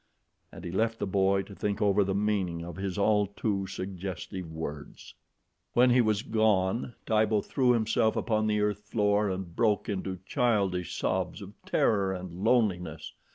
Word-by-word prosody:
And - - -11
he 85 - -4
left 115 +4 0
the - - -2
boy 95 0 +2
to 100 - -12
think 100 +1 -2
over 100 0 +3
the 95 0 -1
meaning 100 -5 0
of 85 -1 -7
his 95 -1 -4
all 105 0 +3
too 100 -1 -2
suggestive 95 -2 -6
words. 75 -2 -7 0.6
When 125 +1 +5
he 125 +1 +5
was 110 -2 +1
gone, 110 +1 +1
Tibo 110 -1 +2
threw 125 +1 +2
himself 110 -1 +1
upon 110 -2 0
the 105 -1 +1
earth 105 -1 0
floor 105 -1 +1
and 95 -2 -5
broke 105 -3 +1
into 95 -2 -3
childish 100 - 0
sobs - - -1
of - - -10
terror 100 -3 +2
and 90 -1 -7
loneliness. 90 -10 +1
100 Hz, 160 wpm, -29 LUFS, 95-110 Hz, 0.6 s, When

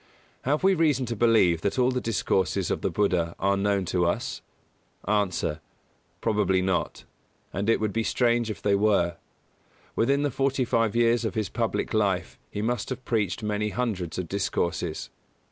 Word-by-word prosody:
Have 150 +5 +1
we 195 0 +5
reason 150 -7 +2
to 120 0 -3
believe 105 -7 +4
that 100 - -1
all 125 0 +3
the 125 0 -1
discourses 95 -4 0
of - - -1
the - - 0
Buddha 90 -5 0
are 100 +1 +2
known 100 -1 +1
to 90 0 +1
us? 85 - -2 0.6
A. 105 -1 +2 0.9
Probably 105 -4 +2
not, 95 -1 -1 0.5
and 100 +3 -1
it 115 - +4
would 110 -2 -1
be 115 - +1
strange 120 0 +1
if 110 - -6
they 100 - +3
were. 100 -4 +2 0.8
Within 140 +5 +2
the 145 - 0
forty 135 -1 0
five 115 -2 +1
years 120 0 +3
of 110 - -2
his 110 -4 -1
public - - -2
life - - 0
he 105 - -4
must 120 +2 -1
have 130 -1 -5
preached 105 -2 -1
many 105 0 -1
hundreds 105 -8 -2
of 90 -2 -3
discourses. 85 -3 -2
105 Hz, 170 wpm, -26 LUFS, 95-120 Hz, 0.9 s, we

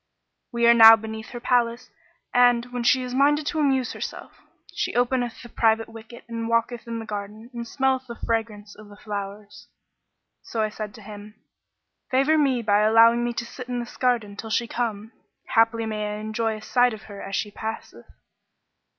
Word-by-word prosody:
We 235 -1 +1
are 235 - +8
now 225 -1 +10
beneath 220 +1 -8
her 240 - -7
palace 240 -1 0 0.4
and, 245 0 +3
when 245 - -2
she 255 +2 +3
is 250 0 -6
minded 290 +3 +3
to 315 +1 -2
amuse 265 -4 +1
herself, - - -7 0.4
she - - -3
openeth 245 -1 0
the 240 - -11
private 225 -1 +1
wicket 225 +1 -12
and 230 -1 -4
walketh 230 +1 -1
in 230 0 -4
the 225 - -6
garden 210 +3 -7
and 235 -1 -6
smelleth 265 0 0
the 235 - -7
fragrance 220 -3 -3
of 215 -1 -14
the 205 - -14
flowers.' 205 0 -7 0.7
So 230 - -6
I 215 - 0
said 210 -1 -7
to 220 - -13
him, 210 0 -11 0.7
'Favour 275 +4 +3
me 265 -5 +1
by 205 -1 +3
allowing 230 +2 +5
me 240 - -1
to 235 - -4
sit 250 +1 -10
in 245 -1 -2
this 240 0 -7
garden 235 -6 0
till 225 +2 -7
she 235 +2 0
come; 225 -2 -3 0.4
haply 225 0 +3
I - - -3
may 210 -1 -3
enjoy 220 +1 -2
a 215 - -12
sight 245 -1 +2
of 215 - -14
her 200 -2 -10
as 195 - -5
she 210 - -2
passeth.' 220 +2 -7
230 Hz, 190 wpm, -24 LUFS, 215-245 Hz, 0.7 s, now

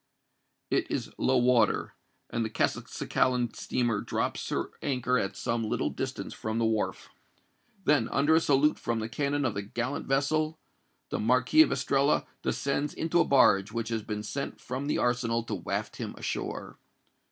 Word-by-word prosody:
It - - +1
is - - -3
low 130 0 +3
water; 125 -1 +3 0.4
and 115 - 0
the 110 - -2
Castelcicalan 125 +2 0
steamer 120 -4 0
drops - - -2
her - - -2
anchor 125 -2 +1
at 95 - -2
some 115 -1 -1
little 110 - -1
distance - - -4
from 110 +1 -3
the 115 - +2
wharf. 110 -1 -1 0.7
Then, 140 -8 +3
under 145 +3 +3
a 160 - +6
salute 145 -1 +3
from 115 -1 -1
the 110 - -3
cannon 145 +3 -1
of 120 - 0
the 100 - -2
gallant 120 +7 -3
vessel, 155 +3 +1 0.5
the - - -1
Marquis 125 - +4
of 315 - +5
Estella 140 +1 +2 0.2
descends 140 +1 -1
into 165 +2 +1
a - - +5
barge 105 -7 +4
which 115 0 -3
has 115 -1 -1
been 105 0 -4
sent 140 +6 -4
from 130 +3 -4
the - - +1
arsenal 120 -1 +1
to - - -5
waft - - -3
him - - -5
ashore. - - -4
125 Hz, 165 wpm, -29 LUFS, 115-140 Hz, 0.7 s, a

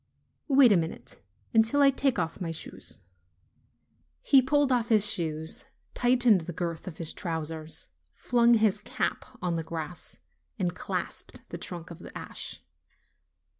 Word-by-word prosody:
"Wait 270 -5 +6
a - - +6
moment, 165 0 -5 0.3
until 225 +5 +4
I 275 - +7
take 270 -2 +1
off 165 +1 -2
my 170 - -2
shoes." 165 - -6 1.2
He 275 -2 +6
pulled 285 +1 +2
off 240 -2 +1
his 215 -3 +5
shoes, 160 -6 -2 0.3
tightened 245 -5 +4
the 170 +2 -6
girth 170 0 -4
of 170 - -7
his 165 -2 -1
trousers, 160 -3 -2 0.3
flung 240 -1 +4
his 215 -2 +3
cap - - -2 0.2
on 180 -1 0
the 165 -1 -1
grass, 160 +1 -6 0.4
and 180 -4 0
clasped - - -4
the - - -6
trunk 175 -1 -4
of 170 - -9
the - - -9
ash. - - -4
185 Hz, 145 wpm, -28 LUFS, 165-240 Hz, 1.2 s, I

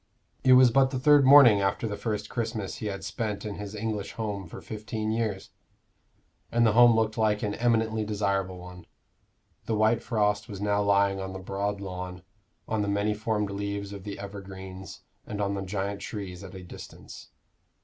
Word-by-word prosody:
It 130 0 +6
was 125 -1 +7
but 135 +2 +4
the 130 - -3
third 145 +1 +5
morning 130 -8 +8
after 100 +3 0
the 105 - -3
first 105 -1 -3
Christmas 110 -4 -3
he 110 - -4
had 100 -2 -5
spent 105 -1 -3
in 105 - -4
his 105 0 -7
English 105 -1 -3
home 100 -4 -4
for - - -9
fifteen 110 0 -4
years, 110 -4 -2 1.0
and 120 0 +3
the 110 - +5
home 120 +1 +7
looked 110 0 0
like 105 -1 +1
an 105 -1 -1
eminently 110 -2 +1
desirable 100 -3 -1
one. 90 0 -11 0.8
The 110 - 0
white 110 +2 +3
frost 105 -1 0
was 100 -3 -7
now 105 0 +1
lying 100 -1 +2
on 95 0 -5
the - - -5
broad 100 +2 -3
lawn, 90 -1 -6 0.4
on 110 -1 -1
the 100 - -1
many 100 +1 +1
formed 105 -1 -1
leaves 100 0 -4
of 100 -2 -8
the 100 0 -6
evergreens 95 -1 -9 0.3
and 105 - -5
on 100 -1 0
the 100 - -3
giant 100 +1 -3
trees 100 -3 -6
at 95 0 -10
a 95 - -9
distance. 90 - -11
105 Hz, 185 wpm, -27 LUFS, 100-110 Hz, 1.0 s, morning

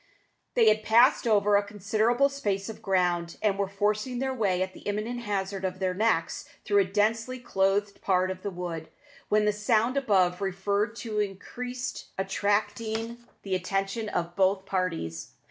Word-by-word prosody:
They 230 -2 +5
had 215 0 +5
passed 235 +4 +4
over 210 -2 +4
a - - +3
considerable 215 +6 +1
space 205 -8 -2
of 220 - -8
ground, 175 -3 0
and 210 -2 +1
were 200 0 -1
forcing 210 +5 -1
their 265 +1 -1
way 195 -7 +1
at 185 0 -6
the - - -12
imminent 215 +4 -3
hazard 195 -3 -3
of 185 -1 -2
their 185 -1 0
necks 195 -4 0 0.2
through 205 -1 +3
a 195 - +4
densely 225 +6 0
clothed 200 -3 0
part 185 -1 +2
of 185 0 -7
the 200 - -3
wood, 175 -3 -5 0.4
when 210 0 +3
the 210 - +3
sound 225 +4 +1
above 190 -8 +2
referred 200 +3 -1
to 215 -2 -2
increased, 245 +5 -4
attracting 210 +4 -1 0.2
the 195 - -3
attention 195 +4 -1
of 175 -2 -2
both 190 0 +2
parties. 165 - -3
205 Hz, 165 wpm, -28 LUFS, 190-220 Hz, 0.4 s, They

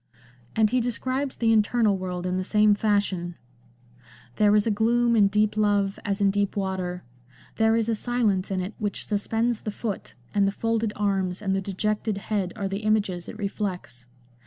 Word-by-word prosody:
And 220 -1 +3
he 250 0 +2
describes 255 +3 -2
the 225 -1 +2
internal 215 -1 +3
world 180 -1 -4
in 185 0 -1
the 185 - -1
same 210 +2 +4
fashion; 200 -4 0 0.3
— 120 0 -30
" 120 0 -24
There 210 0 +4
is 210 - +3
a 225 - +2
gloom 235 +3 +2
in 205 -3 +5
deep 210 +1 +1
love, 205 -2 +1
as 200 0 -2
in 200 -1 +3
deep 200 0 -1
water: 185 -2 -2 0.5
there 220 0 +4
is 230 -1 +1
a 230 - +1
silence 215 -4 0
in 190 -1 -1
it 185 +4 -5
which 205 -2 -3
suspends 225 +2 0
the - - -4
foot, 210 -1 -5 0.2
and 200 -1 +3
the - - +1
folded 225 +1 -1
arms 195 -3 0
and 195 -2 -1
the 195 - 0
dejected 210 +2 -2
head 200 -2 -2
are 200 -3 -2
the 195 +1 -3
images 210 -5 0
it - - -8
reflects. 185 - -4
205 Hz, 190 wpm, -25 LUFS, 190-220 Hz, 0.5 s, in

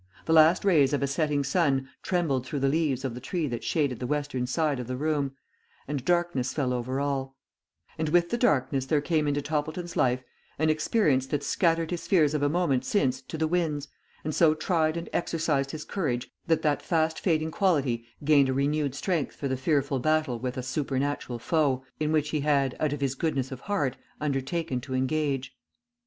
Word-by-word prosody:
The 160 - +1
last 160 +4 +6
rays 150 -8 +4
of 140 - +1
a - - +2
setting 145 0 0
sun 140 -2 +1
trembled 160 -9 0
through 135 +2 -4
the 135 - +3
leaves 140 -3 0
of 130 - -2
the 125 - -8
tree 170 +4 -2
that 120 -5 -4
shaded 130 0 0
the 125 - -3
western 145 -3 -1
side 145 0 0
of 125 - -5
the 130 0 -3
room, 145 -2 0 0.5
and 140 -2 -3
darkness 175 -7 0
fell 130 -4 0
over 125 +2 -2
all; 135 -1 -2 0.6
and 160 -1 0
with 170 +1 +3
the 240 - +1
darkness 135 - +2
there 150 +2 +3
came 155 0 0
into 145 0 0
Toppleton's 155 +4 -3
life 125 0 +2 0.3
an 155 +1 +3
experience 155 - +2
that 145 0 -2
scattered 165 -2 +1
his 175 - -4
fears 155 -6 +4
of 150 - 0
a 145 - +3
moment 145 -6 +1
since 130 -6 +1
to 160 - -7
the 160 0 +1
winds, 155 -4 -1 0.3
and 155 - -2
so 155 -1 +4
tried 155 -1 +1
and 170 - -5
exercised 155 -5 0
his 155 +1 -6
courage, 130 -11 -2 0.2
that 160 -1 +2
that 150 -2 +1
fast 160 -1 0
fading 160 -3 +1
quality 140 -12 +1 0.2
gained 140 -2 +5
a - - +1
renewed 140 0 0
strength 170 -3 -1
for 140 - -3
the 130 - 0
fearful 140 0 0
battle 155 -3 +1
with 125 +1 -4
a 130 - -3
supernatural 135 -1 -2
foe, 135 0 +1
in 155 0 0
which 150 -1 +1
he 155 - -1
had, 140 -3 +1
out 155 -2 +1
of 145 -1 -4
his 135 -2 +1
goodness 135 -2 -1
of 130 - -6
heart, 145 -8 -1 0.2
undertaken 140 -1 -2
to 130 +1 -5
engage. 135 -1 -1
145 Hz, 200 wpm, -27 LUFS, 130-160 Hz, 0.6 s, last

